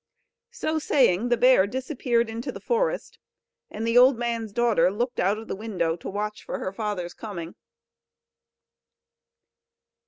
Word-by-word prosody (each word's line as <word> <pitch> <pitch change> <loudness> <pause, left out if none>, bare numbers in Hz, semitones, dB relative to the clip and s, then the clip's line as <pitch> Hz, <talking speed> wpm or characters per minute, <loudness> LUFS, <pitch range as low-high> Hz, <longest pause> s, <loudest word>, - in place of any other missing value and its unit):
So 320 -10 -2
saying 245 - +2
the 240 - +3
bear 250 -6 +5
disappeared 250 -1 -1
into 225 +2 -5
the - - -9
forest, - - -1 0.5
and 220 +2 -5
the 230 +1 +5
old 255 0 +6
man's 230 -2 -2
daughter 215 -6 +3
looked 240 +6 -3
out 195 +4 +2
of 225 - -9
the - - -3
window 190 -6 -2
to - - -7
watch 210 +1 -4
for - - -4
her 185 - -4
father's 195 -5 -3
coming. 175 -6 -7
225 Hz, 145 wpm, -25 LUFS, 200-245 Hz, 0.5 s, old